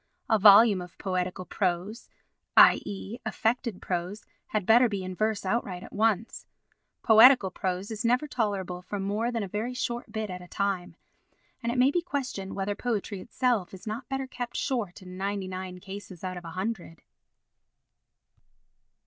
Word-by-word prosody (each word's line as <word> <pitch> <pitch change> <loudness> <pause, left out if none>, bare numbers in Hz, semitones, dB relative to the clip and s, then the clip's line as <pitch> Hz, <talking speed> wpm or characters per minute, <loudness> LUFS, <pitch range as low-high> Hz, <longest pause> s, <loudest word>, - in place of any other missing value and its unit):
A 220 - +5
volume 205 -1 +7
of 180 -1 -11
poetical 185 -1 -2
prose, 185 +5 -2 0.5
i.e. 205 +3 +4
affected 225 -1 -1
prose, 180 +3 -3 0.2
had 210 -3 -2
better 235 +4 +6
be 200 -3 -3
in 185 0 -5
verse 215 +1 -1
outright 190 -3 -2
at - - -12
once. 220 0 0 0.6
Poetical 225 -2 +7
prose 185 +3 -3
is 220 -1 -4
never 250 +5 +2
tolerable 200 -8 -2
for 205 +2 -5
more 210 +5 -1
than 230 -3 -2
a - - -4
very 220 +6 -3
short 240 -2 -3
bit 220 -2 -3
at 180 0 -6
a 180 - -11
time. 195 -1 -2 0.7
And 235 - -1
it 245 - -3
may 255 +2 +5
be 350 - +1
questioned 260 - -4
whether 200 +1 -1
poetry 205 -3 -3
itself 235 -7 -1
is 190 - -13
not 220 +5 -5
better 270 0 -2
kept 245 -2 -6
short 215 -8 -2
in 180 0 -10
ninety 195 0 -2
nine 185 -1 -6
cases 195 -2 -9
out 185 -1 -3
of 180 -1 -8
a - - -6
hundred. 185 -5 -4
205 Hz, 165 wpm, -28 LUFS, 185-230 Hz, 0.7 s, volume